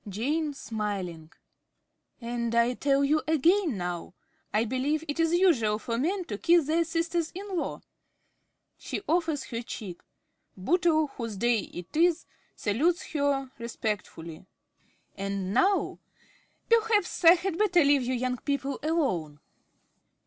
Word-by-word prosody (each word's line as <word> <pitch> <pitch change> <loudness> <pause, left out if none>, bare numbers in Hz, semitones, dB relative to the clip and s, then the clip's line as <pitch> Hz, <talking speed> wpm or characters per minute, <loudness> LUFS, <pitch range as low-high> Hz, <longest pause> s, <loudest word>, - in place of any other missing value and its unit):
~Jane~ 290 - -1
(smiling). 195 -9 -4 0.9
And 235 -1 -3
I 235 +1 +3
tell 275 +2 +1
you 305 +2 +2
again 320 - +3
now. 175 0 -5 0.4
I 220 +2 +2
believe 275 +6 -1
it 290 +2 -4
is 325 0 +3
usual 310 - +3
for 230 +1 -3
men 365 +6 -1
to 205 -7 -5
kiss 335 -2 +4
their 325 +3 +2
sisters 330 0 -1
in 395 0 -5
law? 340 - -3 1.0
(She - - -5
offers 320 -4 +1
her 230 0 -3
cheek. 205 -6 -7 0.6
Bootle, 315 - +2
whose 230 -5 -4
day 235 +2 +2
it 175 - -10
is, 340 +1 +3 0.3
salutes 320 - 0
her 280 -3 0
respectfully.) 205 -7 -5 0.7
And 195 -1 -3
now 390 - +2 0.7
(gaily) 460 0 +5
perhaps 420 -5 0
I 335 0 +10
had 365 0 -3
better 360 -6 +4
leave 285 -1 +4
you 255 +1 -1
young 250 0 -1
people 280 0 -2
alone! 260 - -1
280 Hz, 135 wpm, -28 LUFS, 220-335 Hz, 1.0 s, I